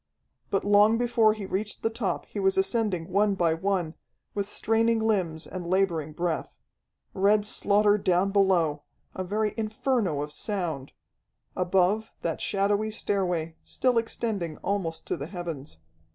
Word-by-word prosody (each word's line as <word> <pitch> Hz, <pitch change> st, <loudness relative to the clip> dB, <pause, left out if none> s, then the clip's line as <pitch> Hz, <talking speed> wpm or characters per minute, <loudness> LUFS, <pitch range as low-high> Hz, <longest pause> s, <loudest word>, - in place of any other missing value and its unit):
But 195 Hz, 0 st, 0 dB
long 205 Hz, +2 st, +5 dB
before 235 Hz, -2 st, +3 dB
he 210 Hz, -2 st, -6 dB
reached 200 Hz, +3 st, -3 dB
the 225 Hz, -, +1 dB
top 230 Hz, +2 st, -2 dB
he -, -, -6 dB
was 385 Hz, 0 st, +2 dB
ascending 215 Hz, -, 0 dB
one 200 Hz, +1 st, +3 dB
by 170 Hz, -3 st, +2 dB
one, 175 Hz, -1 st, -1 dB, 0.4 s
with 200 Hz, -1 st, -2 dB
straining 225 Hz, +1 st, +2 dB
limbs 185 Hz, -8 st, 0 dB
and 180 Hz, -2 st, -6 dB
laboring 175 Hz, -5 st, +1 dB
breath. 170 Hz, 0 st, -3 dB, 0.6 s
Red 205 Hz, +2 st, +3 dB
slaughter 205 Hz, 0 st, +3 dB
down 185 Hz, +1 st, +2 dB
below, 180 Hz, -7 st, +2 dB, 0.3 s
a 185 Hz, -, -3 dB
very 210 Hz, +3 st, -1 dB
inferno 220 Hz, -, 0 dB
of 150 Hz, -, -6 dB
sound; 165 Hz, -8 st, -3 dB, 0.6 s
above, 190 Hz, +4 st, +1 dB
that 165 Hz, -, -2 dB
shadowy 205 Hz, +2 st, +1 dB
stairway, 180 Hz, -7 st, -1 dB
still 250 Hz, -2 st, +1 dB
extending 210 Hz, -8 st, -3 dB
almost 185 Hz, -5 st, -2 dB
to -, -, -1 dB
the 140 Hz, -, -5 dB
heavens. 165 Hz, -, -6 dB
195 Hz, 140 wpm, -27 LUFS, 175-215 Hz, 0.6 s, long